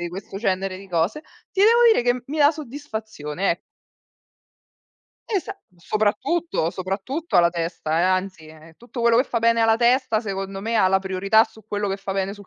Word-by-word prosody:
di 175 - -3
questo 190 +2 -8
genere 190 -2 -1
di 195 - -12
cose, 175 - -1 0.3
ti 385 - -2
devo 460 +3 +6
dire 440 - +3
che 245 0 0
mi 305 +3 -4
dà 290 +1 +5
soddisfazione, 220 - -4
e 170 - -2 1.7
Esa 400 -1 -3 0.2
soprattutto, 215 - -1
soprattutto 195 - -3
alla 170 -1 +5
testa 165 -2 -2
eh, - - +2
anzi, 185 -3 -1
eh-eh, 160 +1 -15
tutto 240 +1 -8
quello 235 0 +4
che 250 - +4
fa 235 - -2
bene 230 0 +3
alla 225 0 +4
testa 240 -1 +2
secondo 195 -2 -5
me 225 +2 -1
ha 190 - +4
la 190 +1 +3
priorità 195 +3 +3
su 220 -1 -18
quello 205 -1 -2
che 195 - -2
fa 195 0 -5
bene 195 0 -2
sul 205 -2 -13
205 Hz, 190 wpm, -23 LUFS, 185-240 Hz, 1.7 s, devo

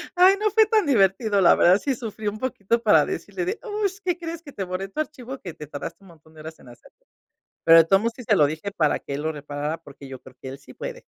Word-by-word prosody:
ay, 370 +2 +6
no 425 0 +1
fue 435 0 +4
tan 430 -5 +2
divertido, 205 -4 +2
la 175 - +6
verdad 185 +4 +5
sí 275 -3 0
sufrí 220 -2 -6
un 205 +1 -2
poquito 235 -2 -1
para 210 - +5
decirle 360 -1 -5
de: 400 +5 -3
"Uh, 425 -3 -1 0.2
¿Qué 355 -1 0
crees? 335 -1 -7
Que 285 - -11
te 200 - -5
borré 185 +1 -5
tu 300 - -8
archivo 270 -4 -5
que 175 - -8
te 150 - -9
tardaste 145 +6 -8
un 190 - -17
montón 160 -1 -20
de 155 - -12
horas 160 +1 -10
en 125 - -16
hacer". 120 - -17 0.7
Pero 165 0 +8
de - - +7
todos 195 +3 +3
modos 230 +1 -1
sí 250 - -10
se 210 - +2
lo 150 - +5
dije 160 +7 -4
para 155 -6 +1
que - - -7
él 140 - -3
lo 160 - -1
reparara, 145 +2 -5
porque 145 -4 -14
yo 130 -1 -9
creo 130 -1 -16
que 130 - -8
él 135 - -8
sí 140 - -15
puede. - - -8
200 Hz, 275 wpm, -23 LUFS, -, 0.7 s, Pero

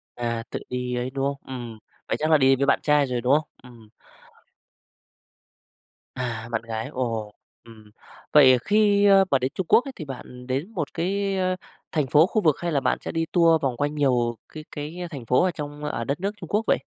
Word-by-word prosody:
À, 115 -1 -3
tự - - -4
đi 125 0 -3
ấy, 125 +1 -2
đúng 135 0 -2
không? 140 0 -1
Ừm, 120 -4 -7 0.3
vậy - - -1
chắc 155 +1 0
là 155 - +7
đi 135 -1 +5
với 140 +1 0
bạn - - +3
trai 150 -1 +3
rồi, 125 -2 -2
đúng 125 +3 +2
không? 150 +1 +2 0.2
Ừm. 115 -3 -15 2.3
À, 115 -2 -4
bạn 110 - -1
gái, 115 -1 -5
ồ, 115 -4 -3 0.3
ừm. 110 -2 -16 0.4
Vậy, 140 -4 +8
ờ, 125 - +5
khi, 205 -1 +4
ơ, 195 -1 +6
mà 135 - +4
đến 130 +1 -1
Trung 190 - -3
Quốc 245 - +5
ấy 275 - -5
thì 155 - -7
bạn 125 -2 -9
đến 140 +11 -2
một 155 -6 -4
cái, 195 +3 -1
ơ, 185 0 0 0.4
thành 150 -4 0
phố, 150 +5 +5
khu 215 - 0
vực 155 -5 +3
hay 175 -1 -2
là 140 - +2
bạn - - 0
sẽ - - -5
đi 165 0 -1
tour 165 -2 +4
vòng 130 -3 -1
quanh 145 +1 -1
nhiều 120 -5 +1 0.2
cái 155 -1 -8
cái 150 +3 -6
thành 135 -7 -8
phố 125 +8 +3
ở 185 - +2
trong 150 -2 -7
ở 135 -5 -3
đất 140 +5 -2
nước 200 +3 -1
Trung - - -10
Quốc 210 +2 +1
vậy? - - +4
140 Hz, 225 wpm, -24 LUFS, 125-165 Hz, 2.3 s, Vậy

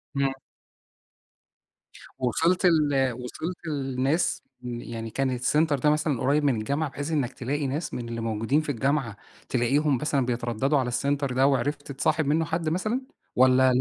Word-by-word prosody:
إمم. 140 -1 +2 1.9
وصِلت 165 +9 +2
ل 145 -6 +3
وصِلت 155 +9 -6
لناس 135 +2 0 0.2
يعني 120 -2 -5
كان 135 +4 0
السينتر 145 +4 +1
ده 150 - +3
مثلًا 150 -4 +1
قريب 145 +3 +2
من 135 -4 +3
الجامعة 140 +7 -1
بحيث 145 +4 -5
إنك 135 -5 0
تلاقي 140 +3 -2
ناس 150 +3 -3
من 120 -1 -4
اللي 115 0 -4
موجودين 115 +7 +1
في 150 - -7
الجامعة 135 -3 -1 0.3
تلاقيهم 135 +3 +2
مثلًا 140 -1 0
بيترددوا 125 +3 0
على 125 - -1
السينتر 140 +1 0
ده 130 +2 +4
وعرفت 140 +2 -1
تصاحب 155 +3 +1
منه 155 +3 +2
حد 165 0 -1
مثلًا 215 +10 -1 0.3
والّا؟ 130 0 +5
140 Hz, 150 wpm, -26 LUFS, 125-150 Hz, 1.9 s, والّا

